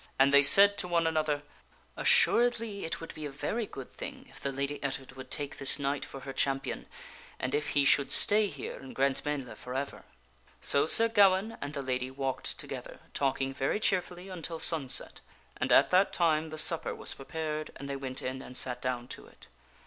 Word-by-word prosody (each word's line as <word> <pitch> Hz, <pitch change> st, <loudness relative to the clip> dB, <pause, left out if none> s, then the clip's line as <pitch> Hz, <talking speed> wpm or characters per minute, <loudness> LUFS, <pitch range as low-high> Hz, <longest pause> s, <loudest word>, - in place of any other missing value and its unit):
And 135 Hz, +1 st, +4 dB
they 140 Hz, -, +8 dB
said 200 Hz, +8 st, +9 dB
to 180 Hz, -, -2 dB
one 170 Hz, -1 st, +1 dB
another, 155 Hz, -2 st, -1 dB, 0.3 s
" -, -, -33 dB
Assuredly 230 Hz, -5 st, +2 dB
it 165 Hz, -, -4 dB
would 165 Hz, -, -9 dB
be 155 Hz, -1 st, -6 dB
a -, -, -8 dB
very 205 Hz, +11 st, -4 dB
good 135 Hz, -2 st, -10 dB
thing -, -, -9 dB
if 135 Hz, -, -13 dB
the 140 Hz, -, -3 dB
Lady 140 Hz, +2 st, -4 dB
Ettard 135 Hz, -1 st, -4 dB
would 130 Hz, 0 st, -11 dB
take 145 Hz, -1 st, -4 dB
this 135 Hz, -, +5 dB
knight 140 Hz, 0 st, -2 dB
for 135 Hz, -, -10 dB
her 135 Hz, 0 st, -8 dB
champion, 135 Hz, 0 st, -2 dB, 0.5 s
and 130 Hz, -, -3 dB
if 150 Hz, 0 st, -1 dB
he 140 Hz, -, +3 dB
should 140 Hz, 0 st, +3 dB
stay 210 Hz, 0 st, +3 dB
here 140 Hz, -8 st, -7 dB
in 135 Hz, -, -12 dB
Grantmesnle 135 Hz, -1 st, -2 dB
forever." 135 Hz, +3 st, -6 dB, 0.6 s
So 140 Hz, +2 st, +2 dB
Sir 230 Hz, +7 st, +7 dB
Gawaine 205 Hz, 0 st, +3 dB
and 145 Hz, +1 st, -6 dB
the 140 Hz, -, -4 dB
lady 130 Hz, -1 st, -3 dB
walked 135 Hz, 0 st, -3 dB
together, -, -, -8 dB
talking 135 Hz, -1 st, -1 dB
very 135 Hz, +9 st, -1 dB
cheerfully, 180 Hz, -2 st, -1 dB
until 170 Hz, -3 st, -5 dB
sunset, 155 Hz, -5 st, +2 dB, 0.4 s
and -, -, -2 dB
at -, -, +5 dB
that 185 Hz, +2 st, +3 dB
time 160 Hz, -2 st, +1 dB
the 155 Hz, -, -8 dB
supper 165 Hz, +1 st, +2 dB
was -, -, -3 dB
prepared 155 Hz, +2 st, -5 dB
and 140 Hz, -, -9 dB
they 140 Hz, -, -4 dB
went 135 Hz, -1 st, -5 dB
in 130 Hz, +1 st, -5 dB
and 125 Hz, -1 st, -8 dB
sat 125 Hz, -1 st, 0 dB
down 125 Hz, -1 st, -3 dB
to -, -, -10 dB
it. -, -, -18 dB
145 Hz, 195 wpm, -29 LUFS, 135-165 Hz, 0.6 s, said